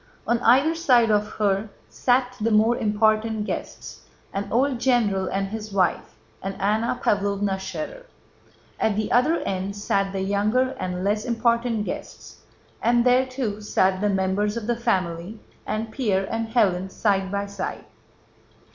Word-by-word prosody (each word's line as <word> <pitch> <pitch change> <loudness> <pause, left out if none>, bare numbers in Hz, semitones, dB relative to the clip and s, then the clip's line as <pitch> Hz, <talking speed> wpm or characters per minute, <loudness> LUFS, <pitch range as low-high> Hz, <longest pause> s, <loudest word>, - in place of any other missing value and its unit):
On 235 0 +1
either 265 +7 +4
side 250 -9 +3
of 210 0 +2
her 205 0 0 0.2
sat 250 0 +1
the 225 - +2
more 220 +2 +4
important 215 0 +1
guests—an 200 -2 -7
old 255 +1 +1
general 225 -7 +2
and 195 0 -2
his 215 0 -6
wife, 185 -3 0 0.3
and 195 0 -5
Anna 220 +4 0
Pávlovna 200 -1 +1
Schérer. 190 - -6 0.7
At 215 - +1
the 215 0 -2
other 300 +8 +3
end 195 +1 -3
sat 195 -1 0
the 195 -1 -3
younger 210 +6 +1
and 180 0 -3
less 210 +2 0
important 235 -1 0
guests, - - -8 0.4
and 240 +1 +3
there 255 +1 +4
too 245 -5 -3
sat 190 -2 +1
the 210 - +2
members 200 +2 0
of 230 - -4
the 240 +1 0
family, 190 -3 -2 0.3
and 220 +1 -3
Pierre 205 -7 0
and 225 0 -1
Hélène, 190 -5 +1
side 195 -2 0
by 200 0 -1
side. 200 -2 -5
210 Hz, 145 wpm, -24 LUFS, 195-235 Hz, 0.7 s, either